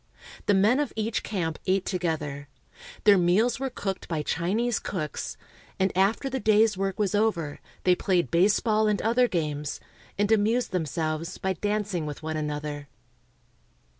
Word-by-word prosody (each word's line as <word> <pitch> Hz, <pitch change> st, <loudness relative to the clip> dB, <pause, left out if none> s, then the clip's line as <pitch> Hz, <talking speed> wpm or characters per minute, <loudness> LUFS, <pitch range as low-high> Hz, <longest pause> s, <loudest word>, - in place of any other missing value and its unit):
The 205 Hz, -, +5 dB
men 215 Hz, +8 st, +4 dB
of 295 Hz, -3 st, -1 dB
each 220 Hz, +1 st, -1 dB
camp 165 Hz, -6 st, -3 dB
ate 190 Hz, 0 st, +2 dB
together. 155 Hz, -6 st, -2 dB, 0.6 s
Their 205 Hz, -3 st, +6 dB
meals 195 Hz, +9 st, +2 dB
were 270 Hz, 0 st, -1 dB
cooked 195 Hz, -6 st, -4 dB
by 155 Hz, -3 st, -2 dB
Chinese 205 Hz, +10 st, 0 dB
cooks; 155 Hz, -7 st, -4 dB, 0.4 s
and 190 Hz, -1 st, +1 dB
after 195 Hz, +8 st, +2 dB
the 265 Hz, 0 st, -2 dB
day's 215 Hz, -1 st, +4 dB
work 195 Hz, 0 st, -2 dB
was 205 Hz, -2 st, 0 dB
over 195 Hz, -9 st, 0 dB, 0.2 s
they 180 Hz, -, +5 dB
played 180 Hz, -1 st, 0 dB
baseball 210 Hz, +5 st, +3 dB
and 210 Hz, -1 st, +1 dB
other 240 Hz, +3 st, +3 dB
games, 150 Hz, -, -2 dB, 0.4 s
and 205 Hz, +1 st, +1 dB
amused 225 Hz, +3 st, +2 dB
themselves 160 Hz, -1 st, -2 dB
by 190 Hz, 0 st, -1 dB
dancing 205 Hz, -5 st, -2 dB
with 150 Hz, +1 st, -7 dB
one 160 Hz, 0 st, -3 dB
another. 150 Hz, -1 st, -4 dB
190 Hz, 150 wpm, -27 LUFS, 160-215 Hz, 0.6 s, Their